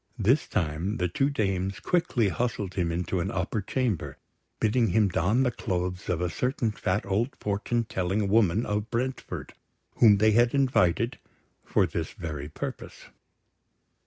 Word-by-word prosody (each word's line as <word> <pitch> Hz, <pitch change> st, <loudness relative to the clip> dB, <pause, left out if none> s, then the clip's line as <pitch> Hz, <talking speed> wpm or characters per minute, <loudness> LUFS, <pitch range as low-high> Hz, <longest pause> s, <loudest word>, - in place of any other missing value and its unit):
This 120 Hz, +7 st, +2 dB
time 85 Hz, +3 st, -1 dB
the 90 Hz, -, +1 dB
two 135 Hz, +11 st, +1 dB
dames 95 Hz, -7 st, -1 dB
quickly 130 Hz, -, +1 dB
hustled 105 Hz, -1 st, -2 dB
him 90 Hz, -3 st, 0 dB
into 90 Hz, +2 st, -1 dB
an 90 Hz, +3 st, -1 dB
upper 95 Hz, +3 st, -2 dB
chamber, 115 Hz, -, -2 dB, 0.4 s
bidding 115 Hz, +2 st, +2 dB
him 105 Hz, +1 st, +3 dB
don 100 Hz, +9 st, +2 dB
the 125 Hz, -, +1 dB
clothes 90 Hz, -3 st, -3 dB
of 85 Hz, -1 st, 0 dB
a 90 Hz, -, 0 dB
certain 125 Hz, -3 st, -1 dB
fat 100 Hz, -1 st, -1 dB
old 105 Hz, +7 st, -1 dB
fortune 105 Hz, +3 st, -1 dB
telling 95 Hz, 0 st, -1 dB
woman 105 Hz, +1 st, +3 dB
of 105 Hz, +1 st, -2 dB
Brentford, 130 Hz, +2 st, -3 dB, 0.4 s
whom 105 Hz, -4 st, +7 dB
they 110 Hz, +2 st, +4 dB
had 120 Hz, +4 st, +3 dB
invited 125 Hz, -3 st, +2 dB, 0.4 s
for -, -, +2 dB
this -, -, -4 dB
very 75 Hz, -4 st, -6 dB
purpose. -, -, -7 dB
105 Hz, 150 wpm, -27 LUFS, 90-120 Hz, 0.4 s, whom